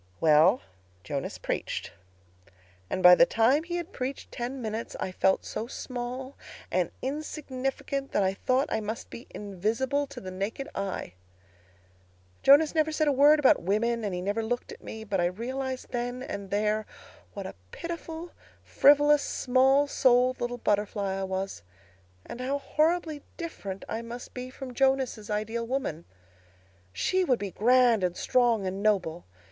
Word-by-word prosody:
"Well, 160 +8 +5 0.4
Jonas 140 -2 -4
preached. - - -3 1.0
And, 185 - -2
by 180 0 +11
the 255 +8 +6
time 245 +7 +3
he 345 +1 -5
had 350 +2 -4
preached 260 +1 -5
ten 245 +3 -4
minutes, 220 -1 -4
I 185 - -2
felt 190 +1 +2
so 225 - -4
small 255 +1 -5 0.4
and - - +1
insignificant 275 -1 -3
that 205 - +2
I 190 0 +1
thought 255 +7 +1
I 220 - 0
must 215 +2 -5
be 235 - -9
invisible 225 +9 -1
to 275 -2 -9
the 185 -4 -7
naked 200 +9 -4
eye. 195 - -4 1.3
Jonas 290 +3 +6
never 315 -1 +2
said 310 0 +1
a - - +5
word 290 +3 +6
about 290 -3 +4
women 225 +5 0
and 205 - -1
he 180 - -3
never 205 +4 0
looked 240 +2 -3
at - - -11
me. 220 0 -7
But 200 -4 -1
I - - +2
realized 255 +7 -4
then 245 +1 -3
and 200 -5 -6
there 210 +1 0 0.5
what 200 -2 -5
a - - -6 0.2
pitiful, 335 - -6 0.3
frivolous, 290 0 +5
small 265 +2 +3
souled 255 -2 +3
little 245 0 -2
butterfly 205 -3 0
I - - -2
was, 190 - -4 0.6
and 245 - -7
how 270 +3 0
horribly 310 +1 0 0.2
different 200 - -6
I 225 - -3
must 235 +1 -8
be 250 0 -6
from 260 -1 -8
Jonas' 265 -5 +1
ideal 220 +2 -2
woman. 235 - -3 0.9
She 370 - +1
would 260 -8 +2
be 200 -3 -5
grand 240 -1 +4
and 180 -1 0
strong 235 -5 +2
and 190 +1 -3
noble. 180 -6 +1
245 Hz, 155 wpm, -28 LUFS, 205-270 Hz, 1.3 s, by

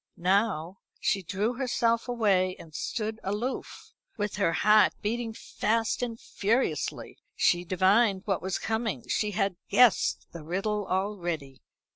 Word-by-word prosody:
Now 190 -1 +1 0.2
she 195 - +1
drew 200 +6 -1
herself 235 -2 0
away 195 -6 +2
and 160 - -13
stood 220 +6 -3
aloof, 210 +7 -4 0.2
with 210 -1 -2
her 195 -5 +2
heart 210 +5 +5
beating 230 +2 -1
fast 225 +1 -1
and 230 -2 -3
furiously. 205 - -1 0.2
She 175 0 +3
divined 190 +3 +3
what 195 -3 0
was 190 0 -2
coming. 220 - -2
She 210 - 0
had 195 -2 -1
guessed 230 +2 +4
the 170 - -8
riddle 195 +5 -2
already. 175 -9 -3
205 Hz, 130 wpm, -28 LUFS, 185-225 Hz, 0.2 s, heart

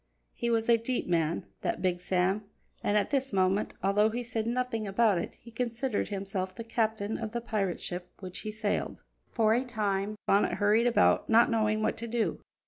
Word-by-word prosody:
He 235 - -2
was 225 -1 +1
a 235 -1 +5
deep 245 +2 -2
man, 165 -2 0 0.2
that 180 - -2
Big 180 -1 +1
Sam, 185 +3 +1 0.4
and 205 - +2
at 210 - 0
this 270 -1 +1
moment, 190 +1 +1
although 205 +2 +3
he 240 +2 -3
said 230 -2 -2
nothing 240 -3 -1
about 200 -1 +3
it, - - -5
he 235 - -15
considered 235 0 -1
himself 195 -2 -3
the 230 - -6
captain 220 -2 -1
of 220 -1 -5
the 240 - -1
pirate 205 -6 -2
ship 180 0 -5
which 185 -2 -6
he 215 - -5
sailed. 215 -1 -2 0.3
For 220 -2 +3
a 245 +3 +2
time 210 -4 -1
Bonnet 200 - +3
hurried 215 +3 +3
about, 240 - +3
not 235 +2 +5
knowing 215 -1 +1
what - - 0
to 235 - -4
do. 235 -1 -1
215 Hz, 195 wpm, -29 LUFS, 195-235 Hz, 0.4 s, a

